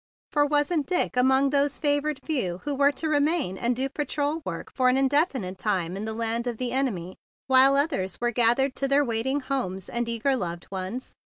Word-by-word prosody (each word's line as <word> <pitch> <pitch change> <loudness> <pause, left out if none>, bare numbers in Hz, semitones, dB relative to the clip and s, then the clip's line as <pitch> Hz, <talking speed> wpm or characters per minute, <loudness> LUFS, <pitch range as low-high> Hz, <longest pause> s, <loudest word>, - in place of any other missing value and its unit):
For 290 -1 +3
was 290 +2 +1
not 305 -5 0
Dick 360 -7 0
among 265 +2 +3
those 285 -1 +1
favored 290 -1 0
few 240 - -1
who 290 - -2
were 280 +1 +3
to 320 - -3
remain 300 - +1
and 240 +5 0
do 265 +2 -1
patrol 290 +2 -2
work 170 -8 -6
for 255 -1 +3
an 255 - +2
in¬ 270 0 +3
definite 265 - 0
time 185 -4 -1
in 200 +2 -4
the 220 - -3
land 230 +1 -1
of 240 -2 -3
the 250 0 -2
enemy, 205 -10 -2 0.3
while 265 +1 +6
others 275 - 0
were 240 0 0
gathered 245 +3 +2
to 275 - 0
their 280 +1 +3
wait¬ 230 0 -1
ing 280 +2 0
homes 195 -9 -3
and 235 0 -2
eager 235 +4 +1
loved 175 -7 -4
ones? 190 +6 -5
260 Hz, 210 wpm, -26 LUFS, 225-285 Hz, 0.3 s, while